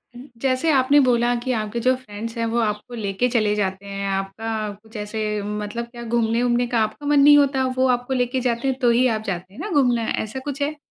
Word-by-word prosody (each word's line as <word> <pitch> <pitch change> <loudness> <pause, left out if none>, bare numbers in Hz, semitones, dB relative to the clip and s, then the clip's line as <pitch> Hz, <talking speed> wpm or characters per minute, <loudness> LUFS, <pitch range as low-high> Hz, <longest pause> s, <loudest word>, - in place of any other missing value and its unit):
ज - - -10 0.2
जैसे 265 +4 +1
आपने 275 +1 +4
बोला 245 -2 +3
कि 255 - -1
आपके 215 +2 -3
जो 255 +2 +3
फ्रेंड्स 230 -2 -8
हैं 230 - 0
वो 235 - +2
आपको 210 +1 -2
लेके 205 +1 -1
चले 215 -4 +2
जाते 195 -1 -2
हैं। 200 0 -4
आपका 215 +3 -3
कुछ 220 0 -19
ऐसे 210 +1 -4 0.2
मतलब 210 +3 -4
क्या 240 -1 -9
घूमने-वूमने 235 +1 +1
का 240 -1 0
आपका 220 +7 -5
मन 290 0 +4
नहीं 290 +1 +8
होता 275 -2 +3
वो 260 0 +3
आपको 245 +2 -5
लेके 250 0 0
जाते 235 +2 -1
हैं 265 -1 0
तो 245 -3 +3
ही 245 +2 +4
आप - - -7
जाते 185 0 -4
हैं 225 - -13
ना 415 - -4
घूमने, 245 -7 +2 0.2
ऐसा 220 +4 -6
कुछ 280 +1 -5
है? 300 +2 -1
235 Hz, 225 wpm, -22 LUFS, 210-260 Hz, 0.2 s, नहीं